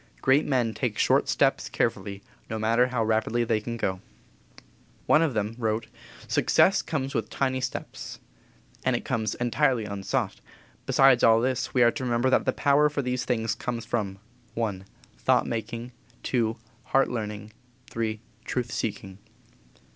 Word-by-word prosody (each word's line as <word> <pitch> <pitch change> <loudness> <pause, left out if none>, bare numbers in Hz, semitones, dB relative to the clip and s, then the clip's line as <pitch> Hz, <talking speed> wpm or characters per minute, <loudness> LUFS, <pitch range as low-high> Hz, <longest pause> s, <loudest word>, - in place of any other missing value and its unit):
Great 135 +3 +3
men 125 -5 +1
take 115 -4 -2
short - - +3
steps - - +2
carefully, 100 0 -2 0.3
no 110 - -3
matter 115 +3 +3
how 125 -3 -1
rapidly 110 +2 +1
they 110 -2 0
can 115 +2 -5
go. 95 -4 -2 1.0
One 155 - +5
of 155 -7 +1
them 105 +1 -1
wrote: 110 -1 -1 0.4
"Success 195 +1 +3
comes 135 -3 -3
with - - -2
tiny 130 -1 -1
steps." 130 - -5 0.7
And - - +2
it - - -4
comes 110 -2 -1
entirely 120 -1 +1
unsought. 100 -2 -2 0.5
Besides 135 -2 +5
all 115 0 +6
this 130 +2 -1
we 125 - +6
are 120 - +5
to 130 - -5
remember 120 +1 +1
that - - +3
the 130 - +3
power 145 +2 +3
for 145 -1 -2
these 125 0 -2
things 115 -3 0
comes 120 +1 -4
from 100 -5 -2 0.4
I. 105 -5 -1 0.4
Thought 130 -1 +3
making; 115 +1 -4 0.4
II. 115 -3 +2 0.3
Heart 135 +1 +2
learning; 105 -2 -5 0.4
III. 110 -1 -1 0.2
Truth 125 -2 -3
seeking. 95 -3 -4
115 Hz, 155 wpm, -26 LUFS, 110-130 Hz, 1.0 s, all